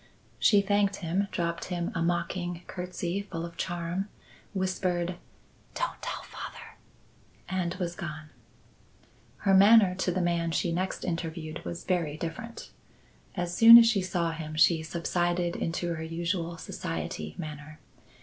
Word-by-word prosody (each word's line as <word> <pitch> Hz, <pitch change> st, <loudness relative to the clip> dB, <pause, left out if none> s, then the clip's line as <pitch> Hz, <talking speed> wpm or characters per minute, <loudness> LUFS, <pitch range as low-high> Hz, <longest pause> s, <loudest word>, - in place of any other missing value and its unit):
She 205 Hz, -2 st, +5 dB
thanked 205 Hz, 0 st, +2 dB
him, 190 Hz, +5 st, 0 dB
dropped 170 Hz, -1 st, -2 dB
him 175 Hz, -1 st, -3 dB
a 170 Hz, -, -2 dB
mocking 175 Hz, +1 st, -1 dB
curtsey 180 Hz, 0 st, -3 dB
full 170 Hz, -4 st, -5 dB
of 170 Hz, 0 st, -9 dB
charm, 175 Hz, +4 st, -3 dB, 0.4 s
whispered 185 Hz, -2 st, -1 dB, 0.6 s
"Don't -, -, -3 dB
tell -, -, -4 dB
father," -, -, -9 dB, 0.7 s
and 185 Hz, -2 st, -1 dB
was 175 Hz, -2 st, -3 dB
gone. 155 Hz, -3 st, -7 dB, 1.1 s
Her 195 Hz, -, +5 dB
manner 200 Hz, 0 st, +7 dB
to 185 Hz, 0 st, -1 dB
the 185 Hz, -, -1 dB
man 170 Hz, -1 st, +1 dB
she 170 Hz, +1 st, 0 dB
next 185 Hz, +3 st, -2 dB
interviewed 165 Hz, -2 st, -4 dB
was 170 Hz, -, -6 dB
very 165 Hz, -5 st, -1 dB
different. 230 Hz, +9 st, -6 dB, 0.7 s
As 175 Hz, 0 st, -2 dB
soon 230 Hz, +3 st, +11 dB
as 235 Hz, -, +8 dB
she 225 Hz, -4 st, +3 dB
saw 175 Hz, -2 st, -1 dB
him 155 Hz, -1 st, -6 dB
she 165 Hz, 0 st, +5 dB
subsided 175 Hz, +1 st, -1 dB
into 170 Hz, +1 st, -2 dB
her 160 Hz, -, -5 dB
usual 170 Hz, +1 st, -2 dB
society 80 Hz, -, -5 dB
manner. 150 Hz, 0 st, -7 dB
175 Hz, 140 wpm, -29 LUFS, 165-185 Hz, 1.1 s, soon